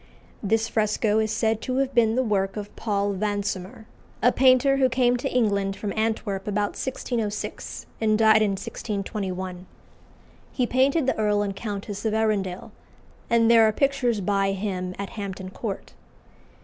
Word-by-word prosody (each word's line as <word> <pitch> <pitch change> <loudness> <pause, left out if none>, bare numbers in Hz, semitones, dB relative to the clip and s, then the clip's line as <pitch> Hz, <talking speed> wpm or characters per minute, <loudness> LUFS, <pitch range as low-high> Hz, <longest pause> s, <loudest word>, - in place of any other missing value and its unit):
This 225 +2 +1
fresco 215 0 +1
is 220 -1 0
said 220 0 0
to 255 - -3
have 270 0 0
been 230 -2 +3
the 260 - +2
work 195 -3 0
of 205 -1 -7
Paul 205 -2 -1
Vansomer, 205 0 -3 0.4
a 245 - +6
painter 260 +1 +4
who 260 -1 +3
came 245 0 +2
to 270 +3 -2
England 200 -5 +1
from 200 -1 -4
Antwerp 215 -3 -1
about 205 0 0
1606, 230 -5 -4 0.2
and 215 -1 +3
died 220 0 +5
in 205 -2 +2
1621. 190 -2 -4 0.8
He 250 - 0
painted 265 +5 +2
the 265 - 0
Earl 210 -1 +2
and 200 -1 -3
Countess 205 -1 -5
of 220 -1 0
Arundel, 200 -4 -1 0.6
and 230 0 +4
there 230 -1 +7
are - - +3
pictures 250 -3 +1
by 195 0 +1
him 185 -2 -3
at 200 0 -5
Hampton 190 -3 -6
Court. 200 -1 -6
215 Hz, 155 wpm, -25 LUFS, 200-235 Hz, 0.8 s, there